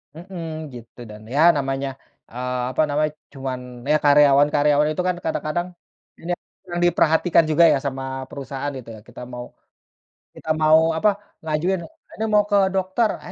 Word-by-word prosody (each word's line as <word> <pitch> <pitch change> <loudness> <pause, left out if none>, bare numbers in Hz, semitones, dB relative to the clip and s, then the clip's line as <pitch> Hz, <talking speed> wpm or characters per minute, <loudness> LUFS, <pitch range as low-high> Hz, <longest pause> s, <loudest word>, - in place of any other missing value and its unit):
Mhm, 175 +1 -9 0.3
gitu. 120 0 -13
Dan, 105 0 -11
ya 150 - +3 0.2
namanya, 135 0 -2 0.4
eee, 125 +1 -3
apa 135 - +1
namanya, 150 +1 0 0.2
cuman 135 -2 -4 0.3
ya 155 - +5
karyawan-karyawan 145 +1 +4
itu 170 - -2
kan 180 - +1
kadang-kadang, 160 +2 -2 0.6
nia 175 0 -1 0.4
yang 175 - -2
diperhatikan 165 0 +3
juga 170 +3 +5
ya - - +2
sama 135 -1 -3 0.3
perusahaan, 140 +1 -5
gitu 115 -3 -10
ya. - - -12
Kita 120 - -11
mau 120 0 -6 0.9
kita 160 - -10
mau 155 0 +6 0.2
apa, 210 +5 +3 0.3
ngajuin, 165 +4 0 0.4
"Ini 220 - -4
mau 210 0 +5
ke - - +4 0.2
dokter," 190 +4 +1
ah, 180 - -9
150 Hz, 155 wpm, -22 LUFS, 135-175 Hz, 0.9 s, mau